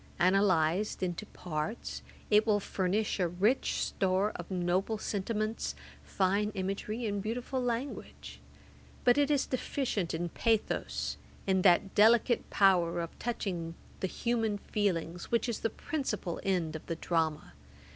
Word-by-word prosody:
Analysed 185 0 +2
into 185 +3 -3
parts, 175 +5 -4 0.3
it 210 +2 +5
will 210 -1 +4
furnish 200 +2 -1
a 180 - +3
rich 200 +9 +1
store 190 +2 +1
of 175 - -7
noble 185 +4 0
sentiments, 215 - -2 0.3
fine 195 - +1
imagery, 200 +4 -3
and 205 -2 -1
beautiful 245 +5 -2
language; 245 +3 -4 0.6
but 245 +3 +5
it 285 0 +3
is 290 -2 +2
deficient 245 - -1
in 170 +1 -2
pathos, 225 +4 0 0.3
in 190 -1 +2
that 185 +1 +4
delicate 230 +3 +4
power 180 -4 +4
of 170 -1 -3
touching 180 -8 -3 0.2
the 190 - 0
human 225 0 0
feelings, 180 -5 -1
which 235 +2 +1
is 235 - -2
the 225 - 0
principal 220 - -3
end 175 -5 0
of 160 - -6
the 165 - -2
drama. 160 -2 -1
200 Hz, 135 wpm, -31 LUFS, 175-225 Hz, 0.6 s, it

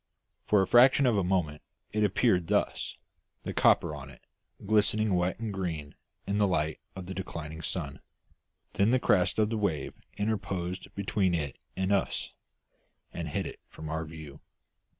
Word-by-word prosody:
For 105 -2 +5
a - - -2
fraction 130 +3 +6
of 120 -3 +4
a 100 - +2
moment 90 -5 0 0.3
it 105 0 +1
appeared 100 -3 +2
thus, - - 0 0.5
the - - -4
copper 80 -3 +4
on 70 -1 -8
it - - -15 0.4
glistening 105 0 +3
wet 90 0 +1
and 110 -3 -3
green 80 -6 -4 0.3
in 100 +1 0
the 100 - +4
light 80 -4 0 0.2
of 95 -1 -6
the 95 - -5
declining 80 -4 -6
sun; 75 -3 -3 0.7
then 100 +2 +3
the 130 - +4
crest 90 -6 +3
of 110 0 +2
the 110 - 0
wave 80 -9 -1 0.2
interposed 95 -4 -2
between 100 -2 +1
it 75 -5 -3 0.2
and 95 +1 0
us, 100 -1 0 0.8
and - - -4
hid - - -2
it - - -7
from 80 -1 -8
our 80 +1 -2
view. 80 -3 -10
95 Hz, 165 wpm, -29 LUFS, 80-105 Hz, 0.8 s, fraction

